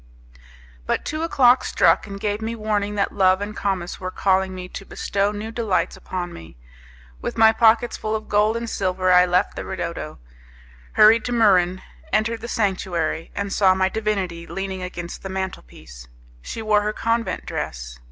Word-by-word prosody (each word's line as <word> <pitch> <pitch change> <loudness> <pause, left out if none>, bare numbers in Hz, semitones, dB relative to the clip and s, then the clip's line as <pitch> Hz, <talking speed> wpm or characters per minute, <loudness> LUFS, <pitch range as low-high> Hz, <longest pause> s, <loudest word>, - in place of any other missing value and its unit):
But - - -1
two 310 +1 -3
o'clock 260 -6 +4
struck - - +3
and 200 -1 -7
gave 205 +1 -2
me 225 +1 -3
warning 210 -2 -1
that 200 - 0
Love 185 -1 +3
and 205 +1 -5
Comus 190 -4 -2
were 185 - -4
calling 190 0 +1
me 180 0 -7
to 190 - -8
bestow 200 +1 -1
new 210 +2 -6
delights 205 -7 -1
upon 175 -1 -5
me. 80 -6 -12 0.6
With - - -4
my 220 0 +7
pockets 225 +1 +3
full 215 0 -2
of 215 0 -5
gold 210 +2 +2
and 235 0 -4
silver, 185 -3 0
I 180 0 +6
left 180 +1 +1
the - - -5
ridotto, - - -5 0.8
hurried 220 +2 +6
to 245 - -3
Muran, 185 -5 +3 0.3
entered 225 +1 0
the - - -6
sanctuary, 185 -8 -1
and 200 0 -3
saw 190 -2 +4
my 190 0 +2
divinity 190 -6 -2
leaning 195 -1 -4
against 175 -1 -6
the 195 - -6
mantelpiece. 65 - -7 0.3
She 225 - -6
wore 210 -1 +3
her 210 +1 -2
convent 230 +1 -1
dress. - - -5
200 Hz, 170 wpm, -22 LUFS, 185-220 Hz, 0.8 s, my